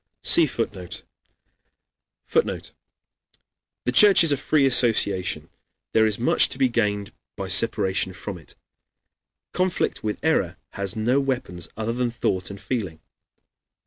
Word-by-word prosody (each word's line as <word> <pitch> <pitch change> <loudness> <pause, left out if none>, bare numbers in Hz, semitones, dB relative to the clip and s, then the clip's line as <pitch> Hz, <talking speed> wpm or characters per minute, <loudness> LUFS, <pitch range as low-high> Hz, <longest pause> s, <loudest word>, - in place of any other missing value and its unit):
[see 165 -2 +6
Footnote] 100 -8 -6 1.2
[Footnote: - - -2 1.1
"The 125 - 0
Church 195 +8 +7
is 165 - +5
a - - +3
free 140 +1 +1
association; 115 -7 +2 0.5
there 110 0 +4
is 105 -2 +1
much 120 - +3
to - - -3
be 130 -1 +2
gained 105 -4 -2 0.2
by - - -6
separation 95 0 +1
from 95 -1 -8
it. 80 - -18 1.0
Conflict 185 -8 -2
with 105 -1 -3
error 100 - 0
has 100 -2 -5
no 120 +5 +1
weapons 125 -11 -4
other 110 +1 -3
than 125 0 -1
thought 95 -5 -2
and 100 0 -9
feeling. 100 -7 -5
110 Hz, 130 wpm, -23 LUFS, 100-130 Hz, 1.2 s, Church